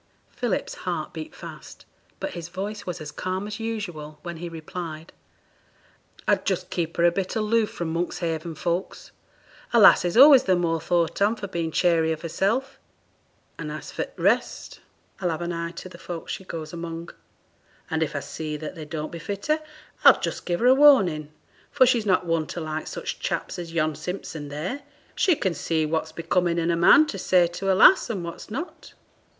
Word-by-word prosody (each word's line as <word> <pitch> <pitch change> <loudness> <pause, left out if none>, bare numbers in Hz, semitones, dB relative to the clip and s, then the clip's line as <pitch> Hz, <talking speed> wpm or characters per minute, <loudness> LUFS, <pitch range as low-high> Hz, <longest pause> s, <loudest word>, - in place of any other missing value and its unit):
Philip's 240 -6 -2 0.2
heart 160 -3 -3
beat 160 -2 -7
fast, - - -11 0.3
but - - -3
his 170 -1 -7
voice 200 +3 -5
was 180 -1 -4
as 150 -2 -7
calm 185 +4 -3
as 210 +1 -6
usual 180 -10 -5
when 170 -1 -6
he 170 +1 -6
replied 165 0 -7 1.1
'I'd - - +3
just - - -2
keep 165 -2 -2
her 170 - +4
a 175 - +6
bit 185 +1 -3
aloof 220 0 +2
from 165 -2 -4
Monkshaven 165 -1 -2
folks; 170 +4 -3 0.6
a 235 - +5
lass 205 - +8
is 175 +4 -1
always 275 0 +9
the 185 - +4
more 165 -2 0
thought 170 +2 0
on 210 +3 +3
for 210 - -6
being 170 -3 -2
chary 165 -1 +2
of 160 +1 -4
herself; 235 - -1 0.8
and - - -5
as - - -7
for - - -2
t' - - -19
rest, - - 0 0.4
I'll 180 - 0
have 165 +1 -3
an 170 0 -3
eye 170 0 -3
to 180 - -8
the 175 -1 -13
folks 170 -2 -6
she 190 - -7
goes 160 -2 -6
among, 170 0 -6 0.8
and 160 0 -2
if 150 -2 -1
I 140 - -1
see 155 0 -5
that 155 0 -6
they 160 -4 -8
don't 155 0 -5
befit 195 +4 -6
her, 310 +1 +1 0.4
I'll - - +8
just - - -4
give 175 +2 -1
her - - +2
a 255 - +8
warning, 195 - +5 0.4
for 265 -3 +5
she's 235 -4 +2
not 185 -1 +3
one 165 -2 0
to - - -5
like 155 -1 -4
such - - -5
chaps - - -3
as 170 -1 -6
yon 155 -2 +1
Simpson 155 -1 -6
there; 170 - -4 0.3
she 365 -5 +3
can 190 -9 -1
see 160 -1 0
what's 160 0 -2
becoming 170 +1 0
in 170 0 +1
a - - +2
man 175 - +7
to 200 -10 -5
say 180 -1 +4
to 175 +3 -2
a - - +3
lass, 345 - +6
and 195 -6 -3
what's 170 +5 -8
not.' 275 +11 -7
175 Hz, 195 wpm, -25 LUFS, 160-200 Hz, 1.1 s, always